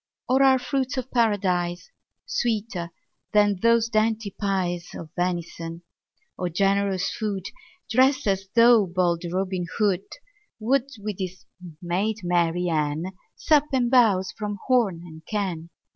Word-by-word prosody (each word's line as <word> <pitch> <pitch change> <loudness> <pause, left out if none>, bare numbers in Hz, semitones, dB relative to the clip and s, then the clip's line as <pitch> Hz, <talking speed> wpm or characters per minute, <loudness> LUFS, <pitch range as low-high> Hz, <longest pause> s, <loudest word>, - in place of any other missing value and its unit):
Or 260 +2 +3
are 265 -1 +6
fruits 260 +1 -2
of 255 0 -4
Paradise 190 - 0 0.3
Sweeter 210 -7 -2 0.4
than 205 -2 +3
those 230 0 +4
dainty 220 -2 0
pies 180 -4 -2
Of 160 -2 -8
venison? 170 -1 -3 0.6
O 180 - -1
generous 195 +1 +1
food! 205 -4 -3 0.4
Drest 260 +4 +3
as 195 -1 0
though 230 -3 +6
bold 175 -1 0
Robin 185 -1 -2
Hood 200 -3 +1
10 - - -12 0.4
Would, 265 +4 +1
with 205 -2 -5
his 185 -1 -5 0.4
maid 200 +5 -1
Marian, 170 -2 0 0.2
Sup 300 -2 +3
and 250 -2 +1
bowse 205 -7 +4
from 210 -2 -5
horn 225 -10 +2
and 160 -2 -12
can. 185 -6 -3
200 Hz, 130 wpm, -25 LUFS, 175-230 Hz, 0.6 s, are